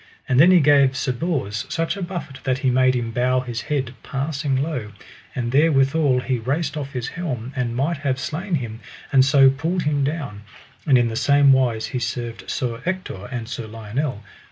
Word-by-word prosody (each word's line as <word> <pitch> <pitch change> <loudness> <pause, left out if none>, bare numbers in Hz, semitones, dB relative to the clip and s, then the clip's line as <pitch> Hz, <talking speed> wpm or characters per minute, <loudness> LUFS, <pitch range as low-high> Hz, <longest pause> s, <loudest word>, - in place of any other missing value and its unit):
And 130 -1 +2
then 170 +5 +8
he 180 -2 +6
gave 140 -2 +4
Sir 130 - 0
Bors 125 - -2
such 165 +3 -1
a 200 - -6
buffet 175 -7 -5
that 130 -1 0
he 130 - +4
made 130 0 +3
him 115 -2 -2
bow 125 +2 +1
his 120 -3 -5
head 135 -4 -2
passing 140 0 -2
low; 130 -7 -2 0.4
and 120 -2 -2
therewithal 140 -2 +3
he 125 -1 -1
raced 140 +9 -2
off 140 -2 -5
his 125 -2 -3
helm, 135 -8 -5
and 120 -3 -2
might 150 +6 0
have 140 -2 -1
slain 175 +6 -2
him; 115 -5 -4 0.3
and 130 -1 +7
so 135 -1 +6
pulled 165 +6 -2
him 145 -1 +1
down, 140 -8 -3 0.5
and 135 -3 +6
in 120 -1 +2
the 110 - -5
same 140 +2 +5
wise 120 -4 +1
he 125 - -3
served 115 0 -4
Sir 120 -3 -2
Ector 185 - -4
and 120 -3 -5
Sir 120 -1 -5
Lionel. 115 +2 -4
130 Hz, 195 wpm, -22 LUFS, 120-150 Hz, 0.5 s, then